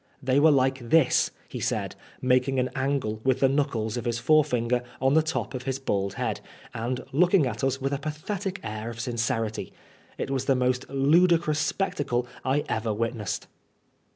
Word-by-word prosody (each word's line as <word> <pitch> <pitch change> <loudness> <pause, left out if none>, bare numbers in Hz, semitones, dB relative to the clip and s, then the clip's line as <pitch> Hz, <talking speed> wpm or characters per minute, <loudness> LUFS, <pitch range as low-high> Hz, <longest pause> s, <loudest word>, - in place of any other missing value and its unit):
" - - -28
They 130 +2 +5
were 160 +2 +6
like 135 -2 +3
this," 160 -3 +4 0.2
he - - -6
said, - - -2 0.3
making 130 +1 +2
an 130 0 0
angle 130 -6 -1
with 130 -1 +2
the 135 - +5
knuckles 130 -5 0
of 120 - -4
his 120 -1 0
fore 155 +5 +4
finger 125 -3 0 0.2
on 135 +1 +2
the 160 - +6
top 160 -1 -3
of 130 - -4
his 135 -1 -1
bald 100 -7 -2
head, - - -2 0.3
and 125 +3 -2
looking 175 +2 +4
at 115 -1 -4
us 135 0 +1
with 135 +1 -1
a 140 - -1
pathetic 185 +6 -4
air 110 +1 -4
of 115 0 -8
sincerity. 115 -2 -2 0.5
It - - -3
was 135 -1 -1
the 135 - +3
most 125 0 0
ludicrous 155 +3 +3
spectacle 150 -7 -1 0.2
I 140 +2 +1
ever 110 0 -1
witnessed. 110 -2 -2
130 Hz, 180 wpm, -26 LUFS, 120-145 Hz, 0.5 s, were